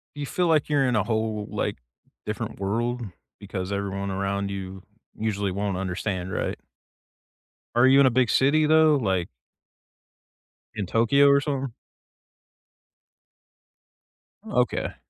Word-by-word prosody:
You 145 0 -4
feel 180 +5 0
like 155 -3 +2
you're 140 -3 +2
in 125 - +1
a 105 - +2
whole, 110 -1 -2
like, - - -2 0.5
different - - -4
world 120 +5 -2 0.3
because 100 -1 -5
everyone 100 0 -3
around 100 +1 -2
you 95 -1 -6 0.4
usually 100 -3 -1
won't 100 +1 -2
understand, 95 0 -3
right? - - -2 1.2
Are 120 +2 +5
you 135 +1 +6
in 140 - +6
a - - +6
big 125 -1 +2
city 145 +6 +3
though, 155 0 +5
like 95 -9 0 1.5
in 105 -3 -2
Tokyo 120 +8 +4
or 140 0 +5
something? 135 -3 -3 2.7
Okay. - - -1
110 Hz, 125 wpm, -25 LUFS, 100-135 Hz, 2.7 s, you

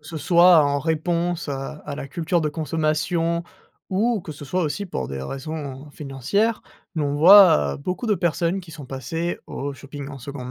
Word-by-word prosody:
ce 160 +2 -9
soit 170 +1 +6
en 145 0 +1
réponse, 170 +2 -1
à 135 +2 -4
à 145 - -4
la 140 - -6
culture 170 +3 -1
de 150 - +1
consommation 165 +2 0 0.5
ou 215 +3 +1
que 155 - -8
ce 145 0 -10
soit 180 +6 -1
aussi 175 +6 -2
pour - - -4
des 70 -1 -5
raisons 140 - -6
financières, 150 - -1 0.3
mais 155 - -1
on 145 -1 -1
voit 160 - +7
beaucoup 180 - -4
de 215 - +3
personnes 175 +1 0
qui 175 - -13
sont 150 -4 -9
passées 165 +7 -3
au 140 +1 -5
shopping 140 0 -9
en 140 - -8
seconde 130 0 -7
155 Hz, 185 wpm, -23 LUFS, 140-175 Hz, 0.5 s, voit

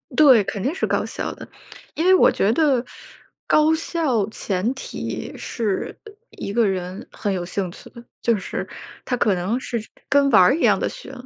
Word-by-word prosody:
对， 260 -9 +7
肯 200 -1 -4
定 280 - 0
是 - - -1
高 - - 0
效 - - -4
的， - - -11 0.5
因 330 - -1
为 375 - +6
我 - - +5
觉 205 - +1
得 275 -6 +2 0.6
高 310 +1 +4
效 290 - 0
前 205 +3 -2
提 265 - -6
是 215 -5 -3 0.3
一 200 - -6
个 235 -1 +3
人 185 +4 -4
很 205 -2 -2
有 175 -2 -3
兴 185 0 -3
趣 - - -13
的， 235 - -13 0.2
就 230 -3 +2
是 190 - -5 0.4
他 250 - -2
可 205 -5 +2
能 195 +8 -1
是 240 - -3 0.3
跟 280 -1 +4
玩 195 - +7
儿 180 +10 +5
一 330 - -4
样 - - +4
的 - - 0
学。 - - -8
235 Hz, 205 characters per minute, -22 LUFS, 195-280 Hz, 0.6 s, 对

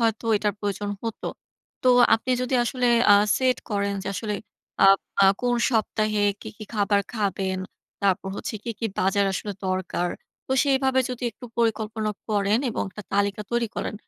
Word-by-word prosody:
হয়তো 225 0 0
এটার 210 -1 0
প্রয়োজন 205 0 -2
হত। 225 -2 -4 0.6
তো 255 - +3 0.3
আপনি 225 +3 -3
যদি 255 +1 -1
আসলে 250 +1 0 0.3
আ - - +9 0.2
সেট 255 -1 +2
করেন 200 -1 0
যে 190 - -4
আসলে 210 +1 -3 0.5
আ - - +9 0.4
আ - - +7
কোন 245 -1 +1 0.2
সপ্তাহে 215 -2 +1 0.2
কি, - - -8
কি 215 - -8
খাবার 205 -1 +2
খাবেন, 195 -3 -1 0.4
তারপর 195 0 +1
হচ্ছে - - -5
কি, 235 - -2
কি 230 - -1
বাজার 195 +2 +2
আসলে 205 +2 -3
দরকার। 185 -1 -1 0.4
তো - - -1
সেভাবে 265 -1 +2
যদি 250 0 -6
একটু 245 - -14
পরিকল্পনা 220 -1 0 0.2
করেন 205 0 +2
এবং - - -2
একটা 210 - -9
তালিকা 200 +1 +1
তৈরি 235 -1 0
করেন। - - -3
215 Hz, 165 wpm, -25 LUFS, 200-235 Hz, 0.6 s, আ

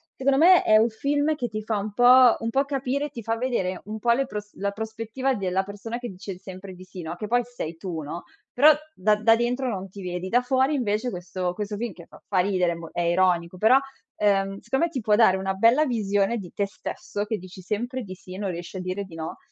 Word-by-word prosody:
secondo 270 0 +2
me 360 +2 +7
è 215 - +4
un 225 +2 +4
film 290 +6 0
che 245 -5 -3
ti 215 0 -5
fa 215 -1 -1
un 205 +1 -4
po' 245 +1 +7
un 225 - -2
po' 270 +4 +1
capire 275 +1 -2
ti 245 -4 -8
fa 225 +1 -1
vedere 225 -7 -1
un 215 +1 -6
po' 235 +2 +2
le 270 +3 +2
pros 210 -3 -7
la 200 +1 -2
prospettiva 225 +5 -3
della 190 -2 0
persona 205 +4 -6
che 240 -1 -6
dice 190 0 -8
sempre 190 +1 -10
di 180 - -12
sì, 185 0 -9
no. 165 +1 -5
Che 210 +4 -5
poi 245 +2 +2
sei 170 -10 -6
tu, 170 -3 -5
no, 155 +4 -6 0.3
però 295 +5 +7 0.2
da 210 -1 +2
da 220 +2 +4
dentro 250 +2 0
non 195 -4 -4
ti 195 +2 -10
vedi, 180 0 -4
da 245 +5 +3
fuori 265 +3 +2
invece 230 -1 0
questo 180 0 -3
questo 205 +1 -4
film 230 -3 -3
che 170 -1 -14
fa - - -16
fa 190 - +1
ridere, 180 -2 +2
è - - -6
mo 165 -1 -9
è 175 - -2
ironico, 175 0 +1
però, 225 +7 +6 0.4
ehm, 195 -1 +1
secondo 265 +5 0
me 340 - -5
ti 270 - -2
può 210 -1 +3
dare 210 -4 +5
una 190 0 -2
bella 230 +10 +4
visione 205 -3 0
di 185 -5 -8
te 200 - 0
stesso, 205 +1 -5
che 220 +1 -2
dici 185 0 -11
sempre 240 +7 -3
di 185 -3 -8
sì 185 0 -12
e - - -7
non 200 -2 -2
riesci 175 +2 -7
a - - -4
dire 185 +2 -3
di 170 -4 -12
no. 160 0 -6
210 Hz, 250 wpm, -25 LUFS, 185-245 Hz, 0.4 s, me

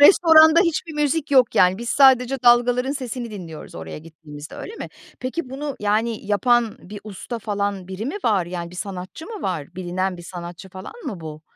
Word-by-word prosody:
restoranda 320 0 +8
hiçbir 325 -2 0
müzik 300 +1 0
yok, 260 -4 +4
yani, 185 +2 +4
biz 235 - -5
sadece 265 -1 +4
dalgaların 245 +2 +4
sesini 250 -3 -5
dinliyoruz 175 -7 -9
oraya 80 - -7
gittiğimizde, 155 -1 -11
öyle 445 - -8
mi? - - -6 0.3
Peki, 255 +3 -4
bunu, 280 +1 -5
yani, 215 +1 0
yapan 235 +2 +2
bir 205 +3 -10
usta 215 +3 -6
falan, 200 -3 -3
biri 190 +5 -5
mi 330 - -3
var? 195 -6 +2
Yani, 175 -1 -5
bir 180 - -11
sanatçı 190 - -6
mı 435 -3 -7
var? 175 -3 -3
Bilinen 185 +1 -2
bir 175 - -10
sanatçı 175 +1 -8
falan 185 +1 -9
mı 205 - -5
bu? 155 -1 -8
215 Hz, 180 wpm, -22 LUFS, 180-265 Hz, 0.3 s, restoranda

